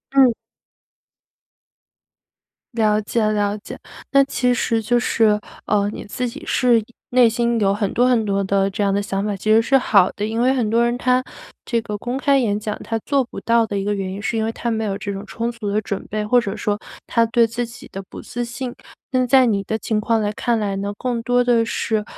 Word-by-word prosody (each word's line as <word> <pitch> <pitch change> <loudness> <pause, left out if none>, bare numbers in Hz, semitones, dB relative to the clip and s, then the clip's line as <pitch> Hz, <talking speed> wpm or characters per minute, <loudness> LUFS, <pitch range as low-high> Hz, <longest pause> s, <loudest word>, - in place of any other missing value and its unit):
嗯。 260 -3 +6 2.4
了 215 -2 +2
解 220 +2 -1
了 210 -1 +1
解， - - -9 0.3
那 275 0 +6
其 250 -2 0
实 230 -2 0
就 240 +3 +2
是， 220 -3 +2 0.3
呃， 205 -1 +2
你 - - -7
自 250 +4 -3
己 235 - -8
是 245 -2 +3
一 215 - -8 0.3
内 245 -2 +6
心 235 0 0
有 195 -2 +3
很 200 -1 -1
多 245 +2 +3
很 240 -3 +2
多 200 -1 0
的 195 0 +1
这 200 - -4
样 200 - +2
的 200 - +1
想 195 -1 -2
法， 210 -1 -1
其 215 +3 -1
实 225 - +6
是 270 +4 +3
好 200 -7 +4
的。 205 - -3
因 225 +2 -1
为 255 +2 +4
很 240 -5 0
多 230 +1 +3
人 240 +1 0
他 255 0 +2 0.4
这 235 - 0
个 210 - -4
公 245 +2 -3
开 275 0 +3
演 210 -5 0
讲， 210 0 -3
他 225 - -2
做 280 -2 +2
不 245 - -9
到 230 -1 +2
的 205 - -3
一 195 - -1
个 205 +1 0
原 195 -2 -3
因 195 - -6
是 225 +2 -2
因 220 - 0
为， 225 - -1
他 235 +1 -3
没 220 -1 -1
有 195 -2 -2
这 200 0 -4
种 195 +1 -6
充 230 +1 -3
足 230 -3 -5
的 205 +1 +1
准 200 -1 -4
备。 210 0 -3
或 245 +3 +4
者 210 -1 -4
说， 210 -1 -1 0.3
他 230 - +2
对 235 0 +4
自 230 +2 -3
己 245 +3 -12
的 195 - -6
不 - - -9
自 240 0 -4
信。 240 +1 -5 0.4
那 255 -1 +1
在 260 +1 +6
你 210 -4 +1
的 220 +3 -2
情 220 -1 -1
况 225 +1 +1
来 210 -1 0
看 235 +2 0
来 205 -2 -1
呢， 200 +1 -3
更 245 -2 -2
多 245 +1 +2
的 240 -2 +3
是， 220 -1 -1
225 Hz, 250 characters per minute, -21 LUFS, 205-240 Hz, 2.4 s, 嗯